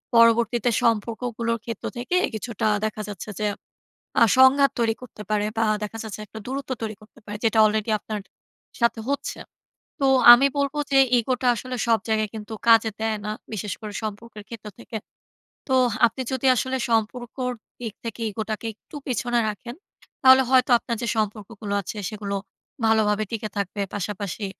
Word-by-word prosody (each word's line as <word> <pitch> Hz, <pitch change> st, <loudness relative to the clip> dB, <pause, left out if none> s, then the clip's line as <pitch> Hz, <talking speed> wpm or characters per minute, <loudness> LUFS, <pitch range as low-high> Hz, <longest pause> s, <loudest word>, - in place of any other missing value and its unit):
পরবর্তীতে 230 Hz, +1 st, +4 dB
সম্পর্কগুলোর 230 Hz, +1 st, 0 dB
ক্ষেত্র 230 Hz, -3 st, -6 dB
থেকে 250 Hz, +9 st, -2 dB, 0.2 s
কিছুটা 220 Hz, 0 st, -2 dB, 0.2 s
দেখা 215 Hz, 0 st, -3 dB
যাচ্ছে 205 Hz, +1 st, -7 dB
যে 210 Hz, -, +1 dB, 0.8 s
আ -, -, +9 dB
সংঘাত 265 Hz, +1 st, +6 dB
তৈরি 225 Hz, -1 st, +2 dB
করতে 225 Hz, -4 st, -10 dB
পারে 210 Hz, -1 st, +1 dB
বা 225 Hz, -, +3 dB, 0.2 s
দেখা 210 Hz, +2 st, -5 dB
যাচ্ছে 215 Hz, -2 st, -7 dB
একটা 215 Hz, +2 st, -10 dB
দূরত্ব 270 Hz, +1 st, -5 dB
তৈরি 215 Hz, -1 st, -4 dB
করতে 215 Hz, -, -19 dB
পারে। 210 Hz, 0 st, -6 dB
যেটা 225 Hz, 0 st, +2 dB
অলরেডি 215 Hz, +1 st, 0 dB
আপনার 210 Hz, 0 st, -5 dB, 0.6 s
সাথে 235 Hz, -1 st, +2 dB
হচ্ছে। 285 Hz, -, -2 dB, 0.6 s
তো 275 Hz, -, +2 dB, 0.3 s
আমি 265 Hz, +3 st, +5 dB
বলব 280 Hz, 0 st, 0 dB, 0.2 s
যে 270 Hz, -, +5 dB, 0.2 s
ইগোটা 250 Hz, +2 st, -1 dB
আসলে 255 Hz, +3 st, -5 dB
সব 225 Hz, -1 st, +4 dB
জায়গায় 215 Hz, -1 st, +1 dB
কিন্তু 215 Hz, +1 st, -7 dB
কাজে 225 Hz, -1 st, +6 dB
দেয় 220 Hz, -1 st, 0 dB
না। 210 Hz, -, -2 dB, 0.2 s
বিশেষ 210 Hz, -1 st, -3 dB
করে 210 Hz, -1 st, -7 dB
সম্পর্কের 215 Hz, 0 st, -7 dB
ক্ষেত্র 225 Hz, -2 st, -9 dB
থেকে। 235 Hz, -1 st, -6 dB, 0.7 s
তো 265 Hz, -, +2 dB, 0.3 s
আপনি 230 Hz, +4 st, -3 dB
যদি 260 Hz, 0 st, -1 dB
আসলে 260 Hz, +3 st, -1 dB
সম্পর্কর 240 Hz, +3 st, -1 dB, 0.3 s
দিক 225 Hz, -4 st, -5 dB
থেকে 230 Hz, 0 st, -6 dB
ইগো 220 Hz, +2 st, -4 dB
টাকে 215 Hz, +1 st, -3 dB
একটু 260 Hz, -, -14 dB
পেছনে 240 Hz, -1 st, 0 dB
রাখেন 215 Hz, +4 st, -6 dB, 0.5 s
তাহলে 260 Hz, 0 st, +8 dB
হয়তো 260 Hz, 0 st, +4 dB
আপনার 235 Hz, 0 st, -4 dB
যে 235 Hz, -, -1 dB
সম্পর্কগুলো 210 Hz, 0 st, -3 dB
আছে 210 Hz, -, -6 dB
সেগুলো 205 Hz, -2 st, -4 dB, 0.5 s
ভালোভাবে 215 Hz, -1 st, +3 dB
টিকে 220 Hz, -1 st, -3 dB
থাকবে। 200 Hz, +1 st, -3 dB
পাশাপাশি 205 Hz, +1 st, -4 dB
225 Hz, 160 wpm, -24 LUFS, 215-240 Hz, 0.8 s, আ